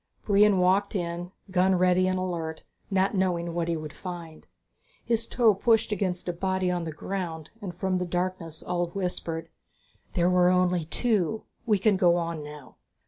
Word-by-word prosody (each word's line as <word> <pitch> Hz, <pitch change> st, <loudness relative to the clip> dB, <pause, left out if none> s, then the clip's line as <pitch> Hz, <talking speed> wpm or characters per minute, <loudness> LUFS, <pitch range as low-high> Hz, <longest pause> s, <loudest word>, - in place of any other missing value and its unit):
Brion 205 Hz, -1 st, +5 dB
walked 190 Hz, +3 st, +2 dB
in, 175 Hz, -1 st, -3 dB, 0.2 s
gun 185 Hz, 0 st, +3 dB
ready 185 Hz, +1 st, +3 dB
and 185 Hz, 0 st, +1 dB
alert, 170 Hz, -3 st, -3 dB, 0.3 s
not 195 Hz, 0 st, +2 dB
knowing 175 Hz, -3 st, 0 dB
what 170 Hz, -1 st, -1 dB
he 170 Hz, -1 st, 0 dB
would 155 Hz, -1 st, -7 dB
find. 170 Hz, -4 st, -8 dB, 0.6 s
His 230 Hz, -1 st, +1 dB
toe 230 Hz, -3 st, +4 dB
pushed 225 Hz, +3 st, +2 dB
against 185 Hz, -3 st, -2 dB
a 175 Hz, -, 0 dB
body 185 Hz, +1 st, 0 dB
on 175 Hz, -1 st, -2 dB
the 160 Hz, -, -4 dB
ground 165 Hz, -1 st, -5 dB
and 185 Hz, -4 st, -6 dB
from 185 Hz, 0 st, 0 dB
the 180 Hz, -, -2 dB
darkness 175 Hz, -2 st, -3 dB
Ulv 175 Hz, 0 st, -2 dB
whispered, 165 Hz, -3 st, -3 dB, 0.7 s
"There 175 Hz, -2 st, +3 dB
were 180 Hz, 0 st, +4 dB
only 180 Hz, -2 st, +2 dB
two. 220 Hz, +2 st, 0 dB, 0.2 s
We 210 Hz, -2 st, +4 dB
can 195 Hz, 0 st, +3 dB
go 175 Hz, -2 st, +4 dB
on 165 Hz, -3 st, -2 dB
now." 150 Hz, -2 st, -11 dB
180 Hz, 170 wpm, -27 LUFS, 170-190 Hz, 0.7 s, Brion